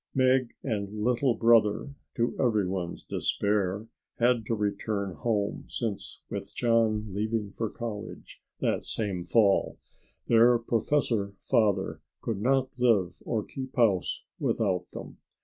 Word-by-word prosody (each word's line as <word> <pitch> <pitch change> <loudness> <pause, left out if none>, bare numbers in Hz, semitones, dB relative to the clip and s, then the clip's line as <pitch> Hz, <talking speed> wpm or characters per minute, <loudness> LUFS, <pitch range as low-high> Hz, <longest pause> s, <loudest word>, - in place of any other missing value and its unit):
Meg 130 -2 +3
and 100 -6 -2
"Little 125 +1 +2
Brother" 115 +3 +3 0.2
to 120 0 0
everybody's 95 -7 0
despair 100 0 0 0.3
had 120 -2 +2
to 115 - +1
return 100 -1 -2
home, 105 0 -1
since 110 -5 -4
with 100 +1 -6
John 110 -3 +1
leaving 105 0 -1
for 115 -2 -2
college, 110 -4 -7 0.2
that - - 0
same 95 -6 -2
fall, 100 0 +3 0.5
their 120 +1 +6
professor 115 -3 0
father 105 -6 +1 0.2
could 110 -4 -3
not 130 +1 +1
live 105 -8 +2
or 110 -3 0
keep 130 -1 -7
house 105 -7 +2 0.2
without 95 -5 0
them. - - -9
110 Hz, 120 wpm, -28 LUFS, 100-120 Hz, 0.5 s, their